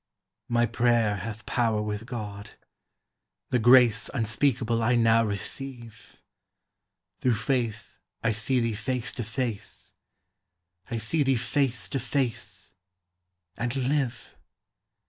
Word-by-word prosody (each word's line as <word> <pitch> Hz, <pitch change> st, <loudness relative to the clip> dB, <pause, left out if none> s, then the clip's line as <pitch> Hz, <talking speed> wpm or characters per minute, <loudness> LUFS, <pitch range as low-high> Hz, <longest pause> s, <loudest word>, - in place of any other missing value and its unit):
My 120 Hz, 0 st, +3 dB
prayer 115 Hz, -2 st, +2 dB
hath 110 Hz, +3 st, -6 dB
power 115 Hz, -3 st, +1 dB
with 105 Hz, +1 st, -4 dB
God; 105 Hz, -4 st, -6 dB, 1.0 s
the 125 Hz, -, +3 dB
grace 120 Hz, -1 st, +6 dB
Unspeakable 115 Hz, +1 st, +1 dB
I 120 Hz, +2 st, +3 dB
now 115 Hz, -1 st, +4 dB
receive; 115 Hz, +2 st, -6 dB, 1.0 s
Through 125 Hz, -3 st, +2 dB
faith 115 Hz, -1 st, -2 dB, 0.2 s
I 115 Hz, -, +3 dB
see 115 Hz, +4 st, 0 dB
thee 115 Hz, -1 st, 0 dB
face 120 Hz, +3 st, -2 dB
to 120 Hz, -, -4 dB
face; 115 Hz, -1 st, -5 dB, 1.0 s
I 115 Hz, -, -2 dB
see 115 Hz, +8 st, 0 dB
thee 135 Hz, -2 st, +3 dB
face 125 Hz, +1 st, 0 dB
to 135 Hz, -, -1 dB
face 115 Hz, -6 st, -3 dB, 0.8 s
and 120 Hz, +2 st, -2 dB
live! 135 Hz, -1 st, -1 dB
115 Hz, 110 wpm, -27 LUFS, 110-125 Hz, 1.0 s, grace